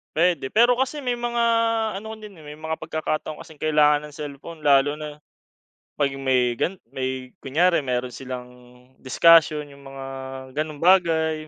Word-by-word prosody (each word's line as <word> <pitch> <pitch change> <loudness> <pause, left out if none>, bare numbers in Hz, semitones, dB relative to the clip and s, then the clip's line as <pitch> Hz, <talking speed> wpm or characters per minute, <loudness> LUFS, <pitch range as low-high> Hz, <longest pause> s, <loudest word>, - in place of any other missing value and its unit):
Puwede, 165 -5 +1
pero 240 +3 +5
kasi 265 +4 -1
may 250 -3 -1
mga, 240 0 -2 0.6
ano, 220 +2 -7
din, 210 -3 -11
eh, 155 - -15
may 150 - -9
mga 160 +1 -5
pagkakataon 155 -1 -4
kasing 160 - -13
kailangan 150 -1 +3
ng 150 - -10
cellphone, 150 +2 -8
lalo 145 -1 +4
na 150 0 -7 0.8
pag 140 -2 +1
may 125 -3 +1
gan 190 - 0 0.2
may 130 -1 -4
kunyari 170 +6 +2
meron 125 -3 -2
silang 125 -1 -7 0.5
discussion 155 +2 +5
yung 140 0 -14
mga 135 0 -8 0.6
ganong 155 0 -4
bagay, 160 -4 +3
150 Hz, 150 wpm, -23 LUFS, 135-170 Hz, 0.8 s, pero